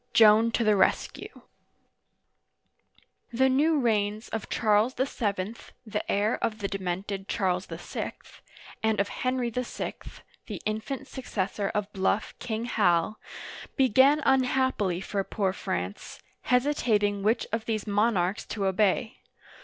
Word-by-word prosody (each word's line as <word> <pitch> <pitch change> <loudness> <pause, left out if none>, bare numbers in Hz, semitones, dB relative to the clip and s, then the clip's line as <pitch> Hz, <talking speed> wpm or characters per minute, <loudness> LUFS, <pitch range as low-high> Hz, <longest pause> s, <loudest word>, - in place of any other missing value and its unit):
JOAN 220 +1 +7
TO 230 +1 0
THE 215 -1 +4
RESCUE 190 - 0 1.9
THE 265 +3 +3
new 300 +4 +3
reigns 215 -3 0
of 220 -2 -4
Charles 215 +3 +2
VII. 215 -5 -2 0.3
(the 210 -1 -3
heir 205 +2 +1
of 215 - 0
the 200 -2 -2
de 195 0 -4
mented 190 +2 -4
Charles 180 -1 0
VI.) - - -5 0.7
and 220 -2 +1
of 200 0 +1
Henry 255 0 -1
VI. 250 +1 -3 0.5
(the - - -5
infant 240 +6 -3
successor 205 -7 -3
of 210 0 -2
bluff 195 +1 0
" - - -44
King 230 -1 -3
Hal") 205 -3 +2 0.6
began 270 +3 +5
unhappily 260 -8 +2
for 195 0 -2
poor 195 0 -1
France, 90 - -4 0.3
hesitating 230 -6 +2
which 215 +4 +1
of 225 0 -2
these 220 -3 -2
monarchs 205 -2 +1
to 200 -3 -3
obey. 210 +4 +1
215 Hz, 130 wpm, -27 LUFS, 200-245 Hz, 1.9 s, JOAN